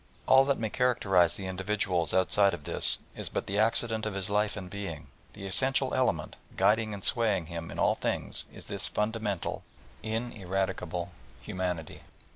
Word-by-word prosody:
All 135 0 +7
that 140 -1 +2
may 110 -2 -2
characterise 100 -9 +3
the 95 - -6
individual 95 -3 0
outside 95 +1 +4
of 75 - -13
this - - +2 0.2
is - - -3
but - - -2
the 100 +2 -1
accident 110 0 +2
of 105 - -4
his 100 +1 -3
life 105 0 +1
and 95 -2 -6
being; 85 -7 -6 0.2
the 100 - -8
essential 130 +7 +2
element, 85 -12 0 0.2
guiding 110 +1 +3
and 100 -2 -6
swaying 105 -7 +2
him 85 0 -6
in - - -7
all - - +3
things, - - -3
is - - -12
this - - -2
fundamental, 105 -3 -2 0.4
ineradicable 95 -6 -2 0.3
humanity. 90 -4 -3
100 Hz, 160 wpm, -29 LUFS, 90-110 Hz, 0.4 s, All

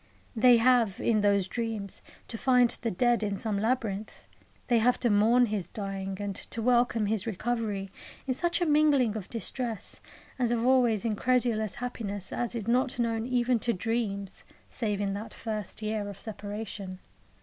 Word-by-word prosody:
They 245 +1 +6
have, 230 -4 +3
in 215 -2 +2
those 200 -2 +3
dreams, 220 -3 -4 0.3
to - - -6
find 250 0 +4
the 230 - -1
dead 240 +4 +2
in 205 -2 -1
some 210 -2 -2
labyrinth; 220 -2 -2 0.4
they 240 -2 +4
have 245 +3 +3
to 240 - +2
mourn 225 +4 +5
his 205 -6 -3
dying 195 -1 -5
and 205 -1 -3
to 230 - -6
welcome 240 -1 +2
his 215 0 -1
recovery 215 -2 -2 0.3
in 260 - 0
such 345 +5 -1
a - - +3
mingling 295 -7 +3
of 210 -4 -6
distress 230 -1 -4 0.4
and 245 -2 +2
of 235 0 +1
always 245 -4 +3
incredulous 230 -1 +1
happiness 205 -6 -4
as 240 -1 -2
is 225 -2 -4
not 255 +3 +1
known 230 -1 0
even 245 -1 +2
to 235 +2 0
dreams 200 -2 -3 0.2
save 210 -4 -2
in 200 -1 -1
that 205 +3 -6
first 215 -1 -4
year 215 -1 -2
of 200 - -9
separation. 205 -3 -6
225 Hz, 165 wpm, -29 LUFS, 205-245 Hz, 0.4 s, They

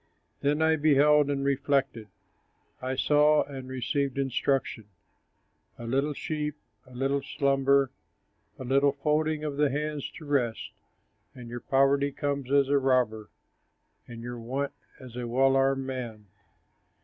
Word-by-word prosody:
Then 150 +2 +1
I 160 0 +3
beheld 150 -1 +4
and 140 -1 -1
reflected, 140 -4 0 0.7
I 130 +1 -2
saw 150 +2 +4
and 135 -2 -9
received 130 +2 -2
instruction: 135 -3 -1 0.9
A 120 - -8
little 135 +5 0
sleep, 150 0 -3 0.3
a 125 - -15
little 135 +2 0
slumber, 140 -1 +2 0.7
A - - -7
little 135 +2 +2
folding 150 +2 0
of 145 -2 -4
the 145 -1 +3
hands 150 +1 -3
to 155 - -11
rest, 130 -6 -1 0.6
And 120 -2 -10
your 120 +1 -5
poverty 140 +1 +2
comes 140 -2 -3
as 140 -1 +4
a 140 0 +3
robber, 125 -5 +1 0.8
And 115 -1 -9
your 120 0 -6
want 135 +5 -3 0.3
as 130 -3 -12
a 125 -1 -4
well 135 +3 +3
armed 135 0 +2
man. 120 -5 -6
135 Hz, 135 wpm, -28 LUFS, 130-145 Hz, 0.9 s, beheld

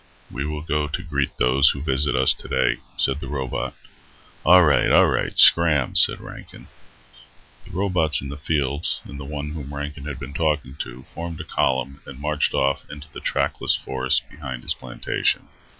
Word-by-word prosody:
"We 70 +3 -4
will 75 0 -4
go 75 -2 -1
to 85 +5 -4
greet 70 -6 -2
those 65 +3 +4
who 70 - -3
visit 70 0 0
us 65 +1 +4
today," - - -1 0.2
said 70 +2 +1
the - - -7
robot. 65 -4 -4 0.7
"Alright, 85 -4 +5
alright, - - +3
scram," 75 -6 +6
said - - +4
Rankin. - - -12 1.0
The - - -14
robots 90 -6 +2
in 70 - -7
the 70 - -6
fields 75 0 -1
and 70 - -10
the 70 - -7
one 75 +1 -5
whom 75 -2 -7
Rankin 75 0 -6
had 70 -4 -6
been 70 0 -8
talking 75 -3 -1
to 65 +2 -7
formed 85 -1 -6
a - - -4
column 70 -1 -1
and 65 - -9
marched 75 +1 -1
off 70 0 0
into 75 +1 -10
the - - -7
trackless - - 0
forests 65 0 0
behind 65 -5 -8
his - - +1
plantation. - - -2
70 Hz, 170 wpm, -22 LUFS, 65-75 Hz, 1.0 s, scram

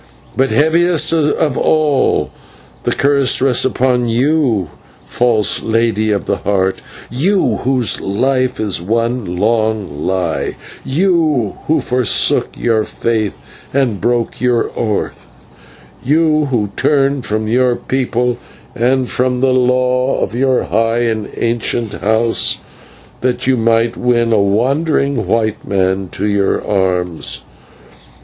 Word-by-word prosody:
But 135 +1 +2
heaviest 160 +1 +2
of 150 -3 +1
all 150 -4 +1 0.5
does - - 0
the - - -12
curse 140 -1 +3
rest 130 -2 +2
upon 125 -2 +1
you, 120 - +1 0.4
false 115 -4 +1
Lady 110 -1 0
of 100 -4 -1
the - - -1
Heart, 95 -1 -1 0.3
you, 180 - +1
whose 130 -3 -1
life 130 +5 0
is 105 -5 -1
one 115 -1 -1
long 110 -7 -1
lie; 90 -4 -1 0.3
you, 155 - 0
who 160 - +2
forsook 125 -2 +1
your 115 -2 +1
faith 110 -2 -2 0.4
and 125 -8 0
broke 120 -2 -1
your 125 -2 +1
oath; 105 -3 -3 0.8
you, 155 +2 +2
who 115 -7 -1
turned 140 -1 +2
you - - -5
from 110 -1 -2
your 125 +2 +2
people 125 -2 -1 0.3
and 125 +2 +1
from 125 0 -1
the 130 -1 +3
law 125 +1 +1
of - - -2
your 130 +1 +1
high 115 +2 0
and 110 -3 -2
ancient 115 -1 -2
house, 110 +2 0 0.6
that 125 0 -1
you 130 0 +3
might 115 0 +1
win 120 -2 +1
a 105 - +3
wandering 135 - 0
white 110 0 0
man 95 -1 -1
to 100 - -3
your 100 -2 +1
arms. 90 -5 -2
120 Hz, 125 wpm, -15 LUFS, 110-130 Hz, 0.8 s, curse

